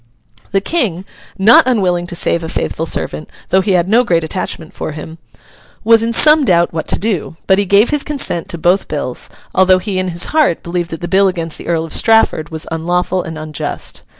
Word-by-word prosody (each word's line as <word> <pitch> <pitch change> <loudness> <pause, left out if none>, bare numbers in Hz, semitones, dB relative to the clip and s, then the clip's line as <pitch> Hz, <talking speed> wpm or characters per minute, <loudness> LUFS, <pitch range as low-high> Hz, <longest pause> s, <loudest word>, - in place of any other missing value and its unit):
The 195 - +1
King—not 205 - +1
unwilling 180 -8 +1
to 175 - -6
save 170 0 0
a 160 - -5
faithful 165 0 -3
servant, 155 - -3 0.2
though 190 - +3
he 190 +1 0
had 175 -1 +2
no 230 +5 +4
great 170 -8 +1
attachment 160 -1 -4
for 155 - -5
him—was 155 - -3
in 230 +1 -1
some 300 +5 +5
doubt 175 -8 +2
what 160 - -4
to - - 0
do; 190 -6 -3
but 190 +1 +3
he 200 - +1
gave 200 +6 +3
his 295 -1 +1
consent 275 - -2
to 170 - -5
both 175 +4 +1
bills, 145 -4 -4 0.2
although 190 0 +4
he 185 0 -3
in 185 - -2
his 175 -1 0
heart 305 - +2
believed 170 0 -3
that 165 0 -7
the 175 - -4
bill 195 +2 +3
against 165 -4 -3
the - - -10
Earl 165 -1 0
of 165 - -5
Strafford 225 -8 +3
was 160 -1 -2
unlawful 175 +3 -1
and 160 -2 -7
unjust. 155 -1 -5
180 Hz, 205 wpm, -15 LUFS, 165-200 Hz, 0.2 s, some